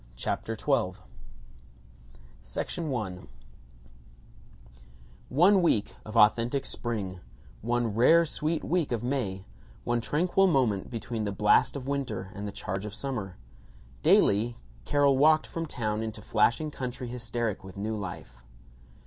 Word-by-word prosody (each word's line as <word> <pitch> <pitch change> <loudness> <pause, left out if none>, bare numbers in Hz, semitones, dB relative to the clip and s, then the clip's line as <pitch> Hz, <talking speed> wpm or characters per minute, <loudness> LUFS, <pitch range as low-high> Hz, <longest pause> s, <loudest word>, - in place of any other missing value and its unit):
CHAPTER - - -3
XII - - +1 1.9
ONE 110 - -4 2.3
week 115 -12 +2
of 110 +1 -5
authentic 115 +5 +4
spring, 100 -6 -4 0.4
one 120 -1 0
rare 165 +10 +5
sweet 155 +1 -2
week 170 -4 0
of 120 -1 -1
May, 110 -8 -2 0.4
one 120 0 0
tranquil 180 +9 +2
moment 125 - +1
between 115 -1 -4
the 100 - -1
blast 105 +6 +3
of 135 -2 -6
winter 140 -9 -3
and 105 0 -5
the - - -4
charge 95 0 -4
of 105 0 -6
summer. 115 -9 -4 0.6
Daily 110 - +4 0.3
Carol 140 -2 +3
walked 155 +2 +5
from 165 -1 -5
town 110 -5 -2
into 110 -2 -5
flashing 120 +9 +2
country 125 -2 -5
hysteric 120 -3 -3
with 95 0 -11
new 110 +2 -2
life. 90 - -7
115 Hz, 120 wpm, -28 LUFS, 105-140 Hz, 2.3 s, rare